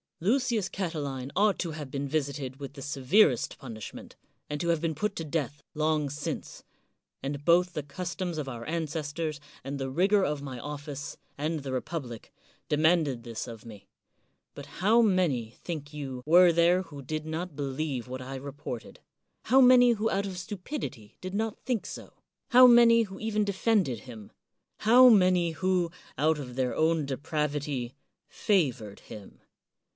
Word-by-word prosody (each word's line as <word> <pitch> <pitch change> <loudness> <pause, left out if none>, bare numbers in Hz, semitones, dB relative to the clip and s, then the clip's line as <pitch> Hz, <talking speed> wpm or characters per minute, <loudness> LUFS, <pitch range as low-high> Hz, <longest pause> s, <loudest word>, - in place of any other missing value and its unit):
Lucius 225 +1 +1
Catiline 145 -8 -4
ought 205 0 +3
to 170 - -3
have 150 -3 -7
been 140 +1 -3
visited 140 -2 -3
with 140 -1 -7
the 140 - -10
severest 140 - +2
punishment, 115 -5 -9 0.3
and 150 0 -3
to 170 - -2
have 170 -2 +2
been 165 -1 0
put 210 +5 -2
to 165 - -4
death 145 -2 -3
long 155 -2 0
since; 145 +1 -5 0.6
and 140 +1 -4
both 175 +1 +4
the 150 - -2
customs 175 +3 -5
of 150 -3 -3
our 120 -3 -6
ancestors, 155 -1 -3 0.2
and 140 +1 -5
the 135 0 -3
rigor 190 +8 +3
of 150 -4 -1
my 130 -3 -6
office, 145 +1 -6 0.2
and 155 +2 -1
the 135 -1 -5
republic, 130 -3 -5 0.4
demanded 150 -5 +2
this 115 0 -6
of 115 -2 -10
me; 105 -4 -12 0.7
but - - -9
how 215 +6 +5
many, 165 - +1
think 150 -4 -5
you, 135 -4 -6
were 175 +2 +7
there 170 +2 +3
who 145 -5 -10
did 155 +3 -4
not 160 +1 -4
believe 135 -2 -3
what 130 +1 -6
I 130 +1 -6
reported? 135 -3 -7 0.5
how 260 +4 +5
many 250 -1 +7
who 225 -1 0
out 200 +1 0
of 185 -2 -6
stupidity 180 - -6
did 185 0 -6
not 220 0 -2
think 230 -7 -1
so? - - -9 0.4
how 255 +1 +8
many 235 -1 +7
who 195 -2 -9
even 215 -1 0
defended 195 - +1
him? 110 -5 -11 0.5
how 250 +3 +7
many 180 -5 +4
who, 180 0 0 0.3
out 155 +2 +2
of 125 -3 -7
their 130 -1 -1
own 160 -1 +2
depravity, 145 -2 -2 0.3
favored 130 - 0
him? 105 -2 -12
155 Hz, 160 wpm, -28 LUFS, 135-185 Hz, 0.7 s, how